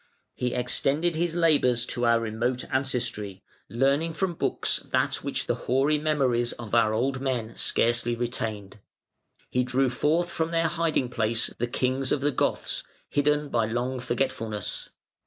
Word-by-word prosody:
He 125 Hz, -1 st, -2 dB
extended 140 Hz, +7 st, +1 dB
his 170 Hz, +1 st, 0 dB
labours 145 Hz, -8 st, +3 dB
to 120 Hz, 0 st, -1 dB
our 115 Hz, 0 st, +5 dB
remote 115 Hz, +3 st, -1 dB
ancestry, 120 Hz, -7 st, -1 dB, 0.3 s
learning 140 Hz, +7 st, +1 dB
from 190 Hz, 0 st, 0 dB
books -, -, 0 dB
that -, -, +1 dB
which -, -, -2 dB
the -, -, +1 dB, 0.2 s
hoary 140 Hz, +4 st, +3 dB
memories 130 Hz, -6 st, +1 dB
of 115 Hz, -3 st, -9 dB
our 115 Hz, -2 st, +4 dB
old 130 Hz, +4 st, 0 dB
men 120 Hz, -4 st, -2 dB
scarcely 120 Hz, 0 st, +1 dB
retained. 110 Hz, -4 st, -4 dB, 0.7 s
He 125 Hz, -, +2 dB
drew 130 Hz, +1 st, +1 dB
forth 160 Hz, +7 st, +1 dB
from 160 Hz, -1 st, -1 dB
their 165 Hz, 0 st, +1 dB
hiding 165 Hz, -6 st, 0 dB
place 115 Hz, -1 st, 0 dB
the 120 Hz, -, 0 dB
Kings 130 Hz, +2 st, 0 dB
of 140 Hz, -, +1 dB
the 145 Hz, +1 st, +2 dB
Goths, -, -, -1 dB, 0.3 s
hidden 150 Hz, 0 st, +2 dB
by 115 Hz, -4 st, +1 dB
long 125 Hz, +3 st, -2 dB
forgetfulness. 120 Hz, -4 st, -2 dB
125 Hz, 150 wpm, -27 LUFS, 120-145 Hz, 0.7 s, our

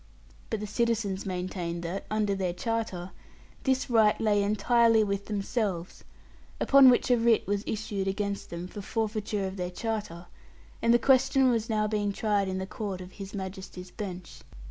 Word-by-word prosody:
But 220 Hz, -2 st, -2 dB
the -, -, -3 dB
citizens 210 Hz, -3 st, -1 dB
maintained 180 Hz, -2 st, -3 dB
that 175 Hz, +4 st, -4 dB
(under 215 Hz, -2 st, +1 dB
their 185 Hz, -3 st, -1 dB
charter) 190 Hz, -3 st, -3 dB, 0.5 s
this 265 Hz, -1 st, +1 dB
right 220 Hz, -3 st, +4 dB
lay 210 Hz, -2 st, +2 dB
entirely 220 Hz, +2 st, +3 dB
with 200 Hz, -1 st, -2 dB
themselves; 200 Hz, -4 st, -2 dB, 0.6 s
upon 275 Hz, -1 st, +7 dB
which 250 Hz, +1 st, +3 dB
a 245 Hz, -, +5 dB
writ 230 Hz, -1 st, +3 dB
was 205 Hz, +1 st, -1 dB
issued 205 Hz, -3 st, -3 dB
against 200 Hz, +1 st, -2 dB
them 170 Hz, +1 st, -5 dB
for 205 Hz, -, -8 dB
forfeiture 215 Hz, -1 st, -2 dB
of 190 Hz, +1 st, -5 dB
their 180 Hz, -1 st, -2 dB
charter; 200 Hz, -3 st, -4 dB, 0.6 s
and 230 Hz, -, +3 dB
the 240 Hz, -, +7 dB
question 265 Hz, 0 st, +4 dB
was 230 Hz, -1 st, -1 dB
now 215 Hz, -1 st, +1 dB
being 210 Hz, -1 st, 0 dB
tried 205 Hz, -2 st, +1 dB
in 190 Hz, 0 st, -2 dB
the 190 Hz, -, -3 dB
court 200 Hz, -1 st, -5 dB
of 185 Hz, 0 st, -9 dB
His 195 Hz, +1 st, -8 dB
Majesty's 190 Hz, -1 st, -7 dB
bench. 185 Hz, -5 st, -7 dB
205 Hz, 165 wpm, -28 LUFS, 190-225 Hz, 0.6 s, upon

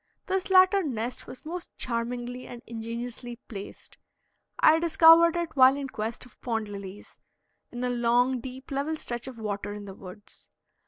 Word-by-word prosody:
This 380 Hz, 0 st, -1 dB
latter 375 Hz, +1 st, +6 dB
nest 245 Hz, -, -4 dB
was 255 Hz, -, -11 dB
most 345 Hz, +2 st, -7 dB
charmingly 240 Hz, +1 st, -3 dB
and 240 Hz, 0 st, -10 dB
ingeniously 235 Hz, +1 st, -6 dB
placed. 200 Hz, -3 st, -10 dB, 0.6 s
I 315 Hz, +1 st, +6 dB
discovered 335 Hz, 0 st, +6 dB
it 340 Hz, -2 st, -3 dB
while 260 Hz, 0 st, +7 dB
in 275 Hz, -1 st, -4 dB
quest 225 Hz, +1 st, -4 dB
of 250 Hz, -, -20 dB
pond 225 Hz, -3 st, -2 dB
lilies, 200 Hz, 0 st, -9 dB, 0.5 s
in 245 Hz, 0 st, -5 dB
a 250 Hz, -, 0 dB
long, 245 Hz, +2 st, +2 dB
deep 260 Hz, +2 st, -9 dB
level 285 Hz, +3 st, -1 dB
stretch 240 Hz, -3 st, -5 dB
of 260 Hz, -3 st, -8 dB
water 205 Hz, -2 st, -4 dB
in 205 Hz, 0 st, -8 dB
the 195 Hz, -, -8 dB
woods. 190 Hz, +2 st, -13 dB
245 Hz, 160 wpm, -27 LUFS, 225-295 Hz, 0.6 s, while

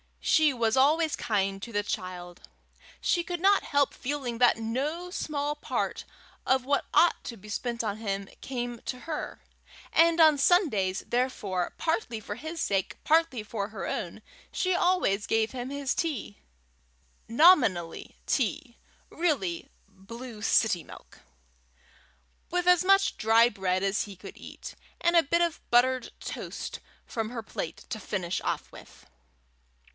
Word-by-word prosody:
She 310 Hz, -2 st, +3 dB
was 230 Hz, -2 st, +1 dB
always 310 Hz, +4 st, +3 dB
kind 195 Hz, -2 st, -1 dB
to 235 Hz, -, -7 dB
the 205 Hz, -1 st, 0 dB
child. 180 Hz, -2 st, -5 dB, 0.6 s
She 345 Hz, -, +1 dB
could 350 Hz, 0 st, -4 dB
not 395 Hz, +1 st, +4 dB
help 285 Hz, -2 st, +1 dB
feeling 260 Hz, -3 st, -3 dB
that 245 Hz, -2 st, +5 dB
no 285 Hz, +11 st, -3 dB
small 295 Hz, -4 st, -2 dB
part 295 Hz, -, -3 dB, 0.4 s
of 260 Hz, -1 st, +2 dB
what 280 Hz, +1 st, +1 dB
ought 345 Hz, -, +4 dB
to 235 Hz, -, -6 dB
be 210 Hz, +2 st, -13 dB
spent 235 Hz, +2 st, -2 dB
on 210 Hz, -2 st, -2 dB
him 200 Hz, -3 st, -3 dB
came 245 Hz, -2 st, -4 dB
to 250 Hz, -1 st, -4 dB
her; 315 Hz, -2 st, -5 dB, 0.5 s
and 335 Hz, +1 st, +5 dB
on 310 Hz, -2 st, +7 dB
Sundays, 240 Hz, -, +2 dB
therefore, 215 Hz, -8 st, -1 dB
partly 320 Hz, -, -1 dB
for 205 Hz, -1 st, -6 dB
his 315 Hz, +7 st, -6 dB
sake, 195 Hz, -2 st, -1 dB
partly 310 Hz, -8 st, +2 dB
for 210 Hz, -1 st, -4 dB
her 220 Hz, -, -6 dB
own, -, -, -4 dB, 0.3 s
she 370 Hz, 0 st, 0 dB
always 350 Hz, -, +1 dB
gave 225 Hz, 0 st, +1 dB
him 250 Hz, 0 st, -5 dB
his 280 Hz, -1 st, -1 dB
tea 285 Hz, -11 st, -3 dB, 0.9 s
nominally 230 Hz, -, +4 dB
tea, 250 Hz, 0 st, -1 dB, 0.3 s
really 255 Hz, -, -1 dB, 0.2 s
blue 215 Hz, +4 st, -10 dB
city 205 Hz, -5 st, +3 dB
milk -, -, -14 dB, 1.3 s
with 355 Hz, 0 st, -1 dB
as 360 Hz, 0 st, +6 dB
much 390 Hz, +1 st, +4 dB
dry 225 Hz, +1 st, +5 dB
bread 190 Hz, -3 st, -1 dB
as 195 Hz, +1 st, +1 dB
he 200 Hz, -2 st, -9 dB
could 185 Hz, -, -11 dB
eat, -, -, -10 dB, 0.2 s
and 340 Hz, 0 st, +2 dB
a 335 Hz, -, +7 dB
bit 340 Hz, +5 st, +1 dB
of 340 Hz, -1 st, 0 dB
buttered 250 Hz, +1 st, +3 dB
toast -, -, -6 dB, 0.3 s
from 225 Hz, -2 st, -3 dB
her 230 Hz, -2 st, -5 dB
plate -, -, -6 dB
to 225 Hz, -4 st, -4 dB
finish 185 Hz, -3 st, -3 dB
off -, -, -3 dB
with. -, -, -15 dB
245 Hz, 145 wpm, -28 LUFS, 210-315 Hz, 1.3 s, on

